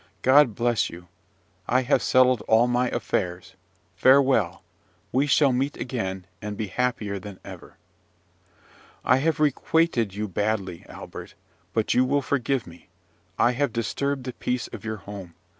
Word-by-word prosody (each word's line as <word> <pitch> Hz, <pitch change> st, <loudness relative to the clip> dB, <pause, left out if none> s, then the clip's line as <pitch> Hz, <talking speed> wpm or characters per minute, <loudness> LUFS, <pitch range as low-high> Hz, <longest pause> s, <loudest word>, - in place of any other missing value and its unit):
God 130 Hz, -4 st, +5 dB
bless 120 Hz, 0 st, +1 dB
you! 90 Hz, +1 st, -12 dB, 0.6 s
I 130 Hz, +1 st, +2 dB
have 130 Hz, -, +2 dB
settled 130 Hz, -3 st, +4 dB
all 110 Hz, +2 st, +5 dB
my 125 Hz, 0 st, +1 dB
affairs! 90 Hz, -6 st, -3 dB, 0.4 s
Farewell! 130 Hz, -5 st, +3 dB, 0.5 s
We 135 Hz, +3 st, +2 dB
shall 145 Hz, -1 st, +4 dB
meet 135 Hz, +3 st, -1 dB
again, 95 Hz, -7 st, -4 dB, 0.2 s
and 105 Hz, -1 st, -5 dB
be 105 Hz, -3 st, -3 dB
happier 110 Hz, -4 st, -1 dB
than 95 Hz, 0 st, -10 dB
ever." -, -, -11 dB, 1.3 s
"I 130 Hz, -, +5 dB
have 155 Hz, +3 st, 0 dB
requited 150 Hz, -, +1 dB
you 105 Hz, +1 st, -2 dB
badly, 100 Hz, -2 st, -2 dB
Albert; -, -, -10 dB, 0.4 s
but 110 Hz, -, 0 dB
you 125 Hz, -, +4 dB
will 140 Hz, +2 st, +1 dB
forgive 135 Hz, -1 st, 0 dB
me. 85 Hz, +2 st, -15 dB, 0.5 s
I 120 Hz, -, +4 dB
have 135 Hz, +1 st, 0 dB
disturbed 130 Hz, +5 st, -2 dB
the 130 Hz, 0 st, -5 dB
peace 125 Hz, -1 st, -2 dB
of -, -, -9 dB
your 110 Hz, -1 st, -4 dB
home. 95 Hz, -3 st, -10 dB
120 Hz, 145 wpm, -25 LUFS, 100-130 Hz, 1.3 s, God